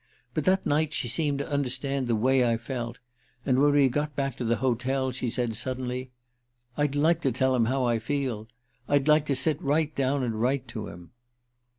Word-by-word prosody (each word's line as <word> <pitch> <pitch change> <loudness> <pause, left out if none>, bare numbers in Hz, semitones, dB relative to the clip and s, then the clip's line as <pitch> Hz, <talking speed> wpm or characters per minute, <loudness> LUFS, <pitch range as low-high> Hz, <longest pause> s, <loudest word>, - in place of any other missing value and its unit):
But 155 - -2
that 190 +1 +2
night 150 +1 +1
she 120 - -2
seemed 140 +4 0
to 140 - -3
understand 135 -1 -1
the 115 - +2
way 130 +4 +3
I 115 -1 +2
felt. 120 0 -5 0.5
And 130 -1 +2
when 145 +1 +5
we 145 -2 +5
got 145 +3 -2
back 135 -2 -1
to - - -3
the 115 0 +2
hotel 130 +2 0
she 125 -1 -3
said 120 -1 -1
suddenly: 130 +1 -3 0.7
'I'd 145 -1 0
like 160 +3 +3
to 135 - +1
tell 130 +2 +1
him 120 -2 +3
how 130 +2 0
I 120 -1 +1
feel. 120 -3 -2 0.4
I'd 145 0 +2
like 150 -1 +4
to 140 - +1
sit 145 +3 +1
right 150 +2 +1
down 135 0 +1
and 115 -3 -2
write 130 +1 0
to 110 -2 -5
him. 85 0 -11
130 Hz, 205 wpm, -27 LUFS, 120-145 Hz, 0.7 s, when